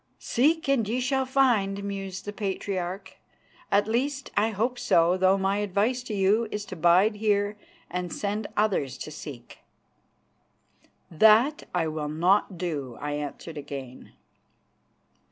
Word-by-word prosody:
"Seek 310 +6 +1
and 245 -7 +2
ye 240 +3 0
shall 265 +1 0
find," 220 -7 +2
mused 195 -2 -5
the 205 - -5
Patriarch; 190 -2 -4 0.5
"at 200 +1 +3
least, 270 +5 -1
I 210 +2 +3
hope 230 +4 -1
so, 170 +2 +3
though 190 +1 +3
my 195 +1 0
advice 205 +5 0
to 220 - -4
you 205 +4 +2
is 210 -1 -4
to 185 - -8
bide 180 +6 +4
here 205 -1 +1 0.3
and 180 -1 -4
send 205 +1 -3
others 185 -11 +1
to 155 - -7
seek." 140 -5 -10 1.5
"That 220 - +4
I 170 -2 +1
will 155 -1 -3
not 180 +5 +2
do," 145 -8 -4
I 145 0 -4
answered 150 +2 -5
again. 135 -3 -9
200 Hz, 135 wpm, -26 LUFS, 175-220 Hz, 1.5 s, bide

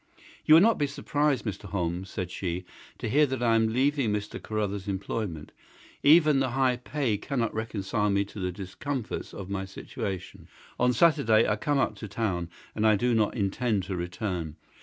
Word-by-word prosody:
"You 155 - +9
will 165 - +8
not 225 +1 +4
be 145 - +2
surprised, 145 -1 0
Mr. 105 -1 -4
Holmes," 90 -1 -3
said 90 -3 -4
she, 90 -1 -3 0.3
"to - - -4
hear 145 +7 +4
that 130 -2 -3
I 115 -1 +4
am 115 0 +4
leaving 135 -1 +2
Mr. 105 0 -3
Carruthers's 105 -2 -3
employment. 95 -4 -4 0.5
Even 155 -2 +6
the 135 -1 +1
high 130 0 +2
pay 125 -3 -1
cannot 120 -2 -1
reconcile 105 -1 -1
me 100 0 +2
to 100 - -10
the 90 -1 -1
discomforts 105 +7 -5
of 100 -1 -8
my 95 -1 -2
situation. 95 -1 -6 0.3
On 125 0 +4
Saturday 125 -7 +4
I 105 - +2
come 145 +7 0
up 135 - +1
to 110 - -7
town 95 -5 -2 0.2
and 110 0 +2
I 110 - +5
do 120 +4 +1
not 110 -2 +2
intend 100 0 0
to 95 +1 -4
return. 90 -2 -3
110 Hz, 180 wpm, -28 LUFS, 95-130 Hz, 0.5 s, You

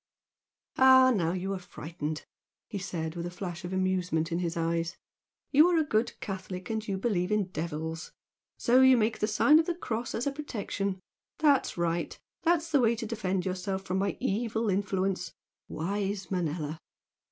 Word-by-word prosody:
"Ah, 260 0 +8
now 170 -4 +1
you 190 +1 -2
are 190 - -3
frightened!" 155 -3 -6 0.4
he 205 - -5
said, 170 -4 -4
with 170 0 -3
a - - -4
flash 175 -1 -6
of 175 - -5
amusement 180 -3 0
in 170 - 0
his 170 -1 -2
eyes 165 +1 -1 0.5
"You 300 +4 +7
are 355 -1 +3
a 320 - +4
good 225 -5 0
Catholic, 185 0 -5
and 220 -1 -3
you 195 -2 -1
believe 190 -3 0
in 210 -3 +1
devils. 160 -1 -4 0.5
So 250 +2 +4
you 260 -1 +7
make 220 0 +1
the 215 - +1
sign 285 +8 +5
of 325 - 0
the 350 - 0
cross 235 -8 -3
as 230 - -2
a 280 - +1
protection. 205 -9 -3 0.4
That's 285 -9 +3
right! 170 0 -1 0.2
That's 335 -1 +1
the 285 -3 +4
way 235 -1 +3
to 225 - -5
defend 195 -5 -2
yourself 190 +1 -2
from 190 0 -1
my 200 0 -1
evil 225 +1 0
influence! 190 -2 -1 0.3
Wise 195 +2 -3
Manella!" 160 -3 -2
195 Hz, 175 wpm, -29 LUFS, 175-230 Hz, 0.5 s, Ah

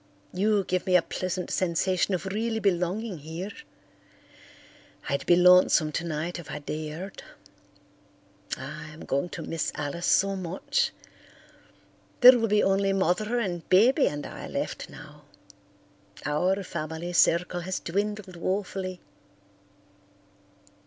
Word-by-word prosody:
You 205 +2 +2
give 185 0 -2
me 185 - +3
a 180 - +7
pleasant 185 0 -4
sensation 185 +1 +1
of 180 - -5
really 220 +4 -2
belonging 190 0 -1
here. 165 +7 -6 1.6
I'd 140 0 -2
be 175 - +6
lonesome 180 -3 +5
tonight 165 +2 -3
if 170 - -10
I - - -4
dared. 155 +5 -6 1.4
I'm 155 0 -8
going 140 +6 -1
to 170 - -6
miss 165 0 -2
Alice 150 +4 -3
so 195 0 +3
much. 185 -1 -1 1.3
There 250 0 +10
will 225 - +1
be 210 0 +3
only 195 0 +2
Mother 195 +5 +1
and 180 -8 -3
Baby 245 - +5
and 145 0 -4
I - - -8
left - - -4
now. 150 0 -13 1.0
Our 180 +7 +1
family 165 +1 -5
circle 175 +1 +3
has 185 +2 -3
dwindled 200 0 -3
woefully." 185 0 -3
180 Hz, 120 wpm, -27 LUFS, 165-195 Hz, 1.6 s, There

